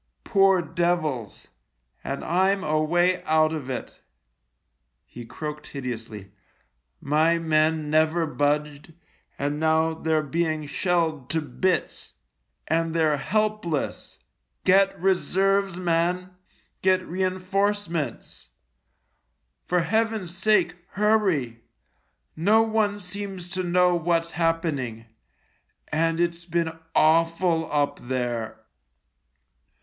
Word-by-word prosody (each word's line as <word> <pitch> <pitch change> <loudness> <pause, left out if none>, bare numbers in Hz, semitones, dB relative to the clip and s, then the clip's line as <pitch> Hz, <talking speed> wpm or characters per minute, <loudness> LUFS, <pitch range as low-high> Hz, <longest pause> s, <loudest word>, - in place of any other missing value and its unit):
Poor 195 -2 +3
devils! 160 - -2 0.5
and 140 - -4
I'm 190 +3 +1
away 175 +4 +2
out 155 0 +3
of 145 -5 -5
it." 125 - -6 1.1
He 120 -1 -11
croaked 150 +2 -6
hideously. 115 -7 -7 0.4
" - - -49 0.2
My 165 +2 +4
men 155 -1 +1
never 160 +2 +2
budged, 150 +1 -1 0.4
and 145 +1 -2
now 160 +1 +2
they're 160 -1 0
being 155 0 -1
shelled 160 -3 -1
to 160 - +1
bits 180 +4 -2 0.3
— - - -50
and 165 +1 0
they're 155 -3 +2
helpless. 215 -3 -2 0.5
Get 195 +1 +4
reserves, 195 +1 +1
man; 180 +1 0 0.5
get 185 0 +2
reinforcements. 185 - -2 1.2
For 180 0 +2
Heaven's 215 -1 -1
sake, 195 -3 +2 0.2
hurry. 190 - +1 0.7
No 210 +8 +4
one 215 -2 0
seems 195 -1 -6
to 185 +1 -2
know 180 0 +3
what's 170 0 0
happening 155 -9 -1 0.4
— - - -44
and 165 +2 0
it's 170 0 -1
been 170 -1 -1 0.2
awful 165 +1 +2
up 145 -1 0
there." 120 -3 -3
165 Hz, 100 wpm, -25 LUFS, 155-185 Hz, 1.2 s, My